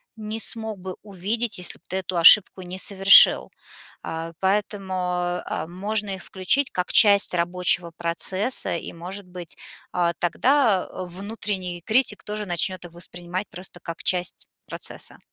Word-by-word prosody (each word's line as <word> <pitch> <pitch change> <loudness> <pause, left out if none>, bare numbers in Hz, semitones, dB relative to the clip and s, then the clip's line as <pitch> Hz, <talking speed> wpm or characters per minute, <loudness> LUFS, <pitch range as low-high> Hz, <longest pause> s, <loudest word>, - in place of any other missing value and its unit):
не 215 0 -6
смог 220 -1 +3
бы 185 0 -8
увидеть, 210 +3 -2
если 180 - -3
б - - -54
ты 190 - -3
эту 185 -1 -4
ошибку 185 +2 +7
не 180 +1 -8
совершил. 195 +1 +7 0.5
А, 165 +1 -6
поэтому, 195 0 -2 0.5
э, 155 - -4
можно 205 +3 -3
их 190 - -10
включить 230 +9 0
как 180 0 -3
часть 200 -3 +5
рабочего 175 0 -1
процесса 185 +8 +1
и, - - -7
может 180 +4 -9
быть, 180 -2 -9 0.4
а, 170 -1 0
тогда 225 - +1 0.2
внутренний 185 -1 -5
критик 225 -2 0
тоже 210 0 -5
начнет 180 +1 -3
их 165 - -16
воспринимать 175 +2 -6
просто 180 +2 -7
как 170 -1 -8
часть 180 -1 -2 0.2
процесса. - - -5
185 Hz, 140 wpm, -22 LUFS, 175-210 Hz, 0.5 s, ошибку